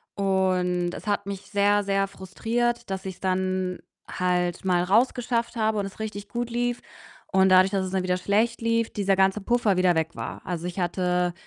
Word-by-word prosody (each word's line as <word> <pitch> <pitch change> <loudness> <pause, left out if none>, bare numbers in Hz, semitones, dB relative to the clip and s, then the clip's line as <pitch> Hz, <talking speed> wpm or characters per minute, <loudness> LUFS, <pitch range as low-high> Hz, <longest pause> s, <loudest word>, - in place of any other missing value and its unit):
und 185 -2 +1
es - - -9
hat 205 -1 0
mich 200 -1 -5
sehr, 205 0 +2
sehr 195 0 +1
frustriert, 230 +5 -2
dass 190 0 -4
ich's 190 -1 -6
dann 185 -1 -1 0.3
halt 180 -1 0
mal 180 -2 +2
rausgeschafft 235 +4 +1
habe 220 -1 +1
und 200 - -1
es 195 - -9
richtig 205 -2 -6
gut 240 +1 -3
lief 245 0 -1 0.5
und 190 0 +3
dadurch, 185 +1 +6
dass 195 -1 0
es 185 - -5
dann 190 -1 0
wieder 180 0 +1
schlecht 215 +6 0
lief, 230 0 +1
dieser 195 -2 +1
ganze 190 +2 +3
Puffer 230 -2 +2
wieder 185 -1 +4
weg 160 0 0
war. - - -6
Also, 175 -1 -3
ich 180 +2 -5
hatte 180 0 0
195 Hz, 190 wpm, -25 LUFS, 185-215 Hz, 0.5 s, dadurch